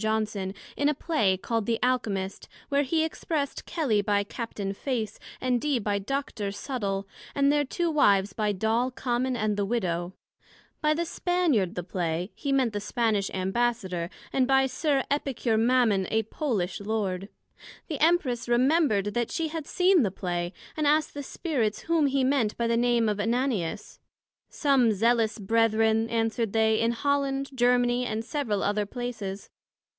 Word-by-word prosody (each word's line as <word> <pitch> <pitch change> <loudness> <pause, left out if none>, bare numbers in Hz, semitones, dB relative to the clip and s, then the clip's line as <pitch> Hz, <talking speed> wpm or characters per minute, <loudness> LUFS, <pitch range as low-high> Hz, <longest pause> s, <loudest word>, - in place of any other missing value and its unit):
Johnson, 215 -3 -1 0.2
in 285 +1 +2
a 300 - 0
Play 265 - +1
call'd, 225 +2 -2
The 230 -1 +1
Alchymist, 205 -7 -1 0.2
where 280 0 +3
he 315 +3 +1
expressed 310 -2 -3
Kelly 270 -12 +1
by 205 0 +1
Capt. 225 +2 -7 0.2
Face, 225 -4 -3 0.2
and 250 -2 0
Dee 290 -2 +1
by 205 -2 -1
Dr. 215 -2 -3
Subtle, 200 -4 -3 0.3
and 280 0 +4
their 295 0 +3
two 335 +5 -1
Wives 200 -9 +3
by 210 0 0
Doll 220 +5 +1
Common, 255 0 -1
and 215 -2 0
the 205 - +1
Widow; 180 -5 -1 0.7
by 305 -1 +3
the 340 +2 -1
Spaniard 330 - +1
the 180 - -3
Play, 175 +1 -2
he 280 - -3
meant 260 -5 +2
the 205 - -1
Spanish 210 -2 0
Ambassador, 190 -3 -1 0.2
and 260 -2 +2
by 270 0 +4
Sir 270 +1 0
Epicure 265 -5 0
Mammon, 225 -4 +3
a 220 0 +1
Polish 220 - -2
Lord. 200 -2 -2 0.6
The 300 -5 -4
Empress 300 -8 +2
remembred 240 - +3
that 240 0 0
she 325 -1 -2
had 315 -2 -5
seen 365 -1 +4
the 210 - +2
Play, 175 -2 -3 0.2
and 305 -2 0
asked 300 +1 +2
the 285 - -5
Spirits, 260 - -2
whom 320 -3 +2
he 275 -1 +1
meant 255 -5 +1
by 235 - 0
the 230 0 +2
name 240 -1 +2
of 210 -1 -1
Ananias? 225 -4 -1 0.5
some 270 -6 +3
Zealous 230 +2 +2
Brethren, 225 +1 +2
answered 225 -1 0
they, 220 -1 +3
in 230 - +2
Holland, 275 +1 0
Germany, 245 0 +2
and 220 +1 -3
several 235 -8 -1
other 205 0 0
places. 220 -5 -5
230 Hz, 160 wpm, -27 LUFS, 205-275 Hz, 0.7 s, and